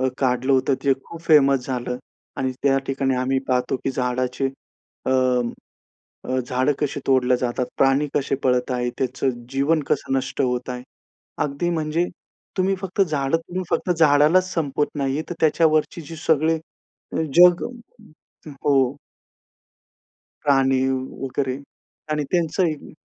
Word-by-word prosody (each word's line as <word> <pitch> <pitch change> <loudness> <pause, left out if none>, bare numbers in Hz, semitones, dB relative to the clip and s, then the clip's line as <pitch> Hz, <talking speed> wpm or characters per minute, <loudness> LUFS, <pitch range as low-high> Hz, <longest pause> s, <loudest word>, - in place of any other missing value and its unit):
अ, 130 - +2
काढलं 130 0 +1
होतं, 130 +1 +3
ते 135 - +5
खूप 165 -1 -10
फेमस 140 -5 +4
झालं. 125 -1 -3 0.4
आणि 130 -1 -1
त्या 135 -1 +4
ठिकाणी 135 -1 0
आम्ही 130 +1 +1
पाहतो 125 +1 +1
की 135 - +1
झाडाचे 125 +1 -1 0.6
अ - - +1 1.1
अ, 130 0 -1
झाडं 130 +3 +1
कशी 145 -1 -1
तोडल्या 130 -2 +3
जातात, 125 0 -1
प्राणी 135 +2 +3
कसे 135 -1 0
पळत 125 0 +2
आहेत, 125 -1 -1
त्याचं 130 +1 0 0.2
जीवन 145 +4 +1
कसं 135 - 0
नष्ट 135 - -3
होत 125 0 -1
आहे. 125 0 -5 0.6
अगदी 150 +5 -2
म्हणजे 160 +1 0 0.5
तुम्ही 190 +1 +2
फक्त 195 0 -4
झाडं 150 -3 +1
तोडून, 180 +3 -5
फक्त 180 - 0
झाडालाच 160 +3 +4
संपवत 145 -3 0
नाही, 140 +2 -1
तर - - -2
त्याच्यावरची 155 +1 +2
जी 165 - -7
सगळी 160 +1 +3 0.6
अ, - - 0
जग 175 0 +7 1.0
हो. 135 -2 +3 1.5
प्राणी 135 -2 +3 0.4
वगैरे 135 0 -2 0.5
आणि 150 -1 0
त्यांचं 175 +2 +1
ही 155 -2 -4
135 Hz, 135 wpm, -22 LUFS, 130-155 Hz, 1.5 s, जग